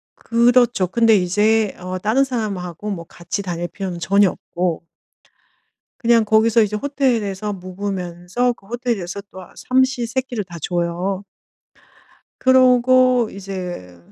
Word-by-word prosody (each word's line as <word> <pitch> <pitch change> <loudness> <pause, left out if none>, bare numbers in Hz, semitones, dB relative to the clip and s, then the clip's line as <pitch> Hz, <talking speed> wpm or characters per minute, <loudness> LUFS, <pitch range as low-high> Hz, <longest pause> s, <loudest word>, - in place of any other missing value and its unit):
그렇죠. 235 -4 +3
근데 230 +2 +4
이제 210 +3 +2
어 185 +1 -5
다른 220 +8 +2
사람하고 210 - -4
뭐 170 -4 -5
같이 175 +5 -5
다닐 175 -2 -4
필요는 185 -3 -6
전혀 195 +3 +3
없고 175 -2 -3 1.1
그냥 230 -2 +3
거기서 220 +1 +4
이제 210 0 0
호텔에서 215 -6 -1
묵으면서 185 +4 -3
그 195 - -24
호텔에서 225 -6 -3
또 185 - -10
아 180 - -15
삼시 260 -1 +1
세끼를 245 -3 -3
다 175 -2 -10
줘요. 175 +3 -2 1.1
그러고 255 -2 +4
이제 180 - -7
205 Hz, 260 characters per minute, -20 LUFS, 180-240 Hz, 1.1 s, 근데